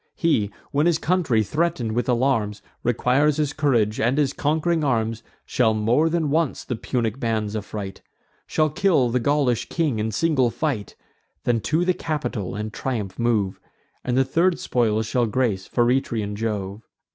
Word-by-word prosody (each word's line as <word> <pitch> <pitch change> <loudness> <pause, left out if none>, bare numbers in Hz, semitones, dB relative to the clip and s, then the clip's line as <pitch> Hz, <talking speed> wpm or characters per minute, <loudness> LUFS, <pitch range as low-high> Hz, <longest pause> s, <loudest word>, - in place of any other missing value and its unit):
He, 150 - +1 0.2
when 145 +4 +2
his 170 -2 +3
country, 160 -12 +1
threaten'd 130 - -1
with 120 +3 -1
alarms, 115 -5 +1 0.2
Requires 130 +5 +2
his 150 -2 0
courage 115 -7 +1
and 120 +5 +1
his 145 -3 +2
conqu'ring 160 +2 0
arms, 115 -4 0 0.2
Shall 110 -3 +2
more 120 +9 +2
than 160 -3 0
once 160 -2 0
the 125 - -3
Punic 115 0 -2
bands 110 -3 -1
affright; 105 -2 -5 0.5
Shall 155 -1 +1
kill 155 -7 +2
the 125 +2 +1
Gaulish 135 -2 +1
king 150 -9 0
in 110 +1 -1
single 135 0 +2
fight; 125 -5 -3 0.5
Then 120 -2 +1
to 160 +8 +1
the 185 - +3
Capitol 145 - -3
in 105 +1 -4
triumph 110 -6 -4
move, 110 -5 +1 0.4
And 125 0 0
the 135 - +4
third 170 +6 +2
spoils 110 -3 0
shall 120 +1 +1
grace 105 -5 0
Feretrian 120 -4 0
Jove." 105 -2 -3
125 Hz, 155 wpm, -23 LUFS, 110-150 Hz, 0.5 s, the